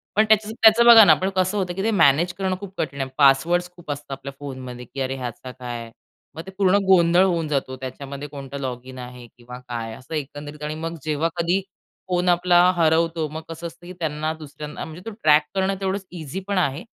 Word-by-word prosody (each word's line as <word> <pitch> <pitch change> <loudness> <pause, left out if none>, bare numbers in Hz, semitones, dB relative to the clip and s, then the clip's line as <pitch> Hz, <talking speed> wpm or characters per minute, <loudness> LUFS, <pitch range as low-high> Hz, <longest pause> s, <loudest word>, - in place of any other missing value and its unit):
पण 215 - +4
त्याचं 215 0 +3
त्याचं 225 +1 +7
बघा 230 -2 +10
ना - - +8
पण 190 +1 -1
कसं 185 +2 +1
होतं 180 -2 -1
की 195 - -3
ते 225 - +1
मॅनेज 170 -1 +4
करणं 190 -1 -2
खूप 195 -2 -9
कठीण 140 -2 -3
आहे, 130 - -3
पासवर्ड्स 160 +6 +4
खूप 175 -4 -8
असतात 145 0 -7
आपल्या 135 0 -6
फोनमध्ये, 130 -3 -7
की 135 +3 -7
अरे 135 0 -2
ह्याचा 125 0 -6
काय? 120 -2 -7 0.4
मग 160 - -5
ते 190 - -9
पूर्ण 195 0 +4
गोंधळ 175 -1 +5
होऊन 170 -4 0
जातो 135 -3 -2
त्याच्यामध्ये 140 +2 -7
कोणतं 140 -1 -8
लॉगिन 130 0 -6
आहे 125 0 -9
किंवा 125 +1 -10
काय? 120 -3 -6
असं 130 +5 -11
एकंदरीत 145 +1 -6
आणि 150 +1 -3
मग 165 +1 -5
जेव्हा 155 +1 0
कधी 175 +3 +1 0.5
फोन 180 0 +1
आपला 175 0 +4
हरवतो. 165 -1 +2
मग 155 +2 -6
कसं 165 +1 -6
असतं 170 +1 -14
की 180 - -8
त्यांना 155 0 -2
दुसऱ्यांना 150 -1 -8
म्हणजे 160 +3 -10
तो - - -8
ट्रॅक 150 0 +6
करणं 195 0 +1
तेवढंच 190 0 -2
इझी 170 +1 -6
पण 200 -1 -1
आहे. 160 -2 0
155 Hz, 210 wpm, -23 LUFS, 135-180 Hz, 0.5 s, बघा